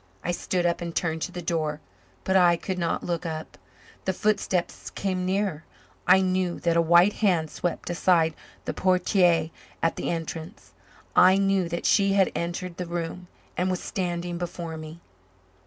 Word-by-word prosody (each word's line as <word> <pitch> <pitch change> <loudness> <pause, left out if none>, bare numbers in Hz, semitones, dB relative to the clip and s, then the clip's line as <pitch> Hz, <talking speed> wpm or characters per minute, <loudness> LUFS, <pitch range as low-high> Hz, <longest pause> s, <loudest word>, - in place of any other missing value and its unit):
I 175 - 0
stood 175 0 -1
up 170 0 +1
and 170 -1 -5
turned 160 -2 -1
to - - -3
the 175 - -6
door, 155 -3 -1 0.4
but 190 - 0
I 175 -2 +6
could 185 +1 -4
not 170 -1 -1
look 170 -2 -2
up. 160 -2 -5 0.5
The 190 - +1
footsteps 195 -3 -1
came 185 -2 -2
nearer; 190 -4 -1 0.4
I 190 - +7
knew 185 -1 0
that 170 -1 +1
a 170 - +5
white 175 +4 +5
hand 175 -7 +2
swept 175 - -3
aside 170 -2 +2 0.3
the - - -2
portière 180 -3 +2 0.3
at 165 - +1
the - - -2
entrance; 165 +3 -6 0.4
I 185 +1 +7
knew 195 -3 +1
that 170 0 -4
she 195 -1 +4
had 195 -1 +3
entered 170 +1 -4
the 180 - -4
room 170 +1 -4 0.3
and 180 +1 0
was 185 -1 -1
standing 175 -2 -3
before 170 -2 -5
me. 155 +1 -9
175 Hz, 170 wpm, -26 LUFS, 170-185 Hz, 0.5 s, I